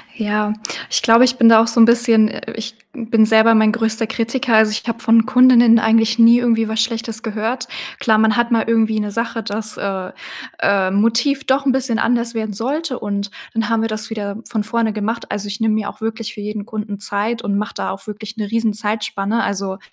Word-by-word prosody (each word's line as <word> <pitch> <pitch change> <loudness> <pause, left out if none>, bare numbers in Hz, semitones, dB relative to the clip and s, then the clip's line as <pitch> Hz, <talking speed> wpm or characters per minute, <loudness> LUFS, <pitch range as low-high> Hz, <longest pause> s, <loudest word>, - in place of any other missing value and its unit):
Ja, 210 -1 -1 0.4
ich - - +1
glaube, 230 +2 +5
ich 250 0 +2
bin 230 - +5
da 225 -1 +7
auch 230 - +1
so 230 +1 -1
'n 225 - +9
bisschen 235 -2 +4
äh, - - -8
ich 225 0 -7 0.2
bin 230 -4 +1
selber 220 +1 +5
mein 220 -1 +4
größter 225 0 -1
Kritiker, 235 +2 -1
also, 220 -1 +4
ich 215 - -4
habe 230 0 -3
von 225 -1 +3
Kundinnen 245 -2 +5
eigentlich 225 0 +2
nie 230 +1 +6
irgendwie 230 -2 +1
was 220 0 -1
Schlechtes 225 -1 -4
gehört. 225 +3 -3 0.3
Klar, 225 -6 +2
man 220 -1 +2
hat 235 0 0
mal 230 -1 +2
irgendwie 220 -1 +1
'ne 210 -1 -3
Sache, 230 +1 -3
dass, 215 +1 -3
äh, 190 -2 -4 0.5
äh, 195 -2 +1
Motiv 230 +7 +1
doch 270 +1 +1
'n 270 - +3
bisschen 255 -3 0
anders 235 0 0
werden 220 -2 -3
sollte 265 +6 -3
und 200 -1 -4 0.2
dann 225 0 -2
haben 225 -1 +1
wir 225 - 0
das 215 0 -4
wieder 205 -2 -5
von 220 -3 -2
vorne 230 0 -1
gemacht. 220 +2 -4
Also, 205 0 -4
ich 205 +2 -6
nehme 220 -1 +1
mir 215 -1 -2
auch - - -14
wirklich 225 0 -4
für 210 - -9
jeden 210 0 -6
Kunden 210 -2 -6
Zeit 210 +3 -1
und 200 -1 -1
mache 210 +2 -4
da - - -3
auch 195 - -9
wirklich 215 +1 -8
'ne 210 -3 -5
riesen 225 -1 0
Zeitspanne. 210 0 -2
Also, 195 -1 -3
225 Hz, 220 wpm, -18 LUFS, 210-230 Hz, 0.5 s, n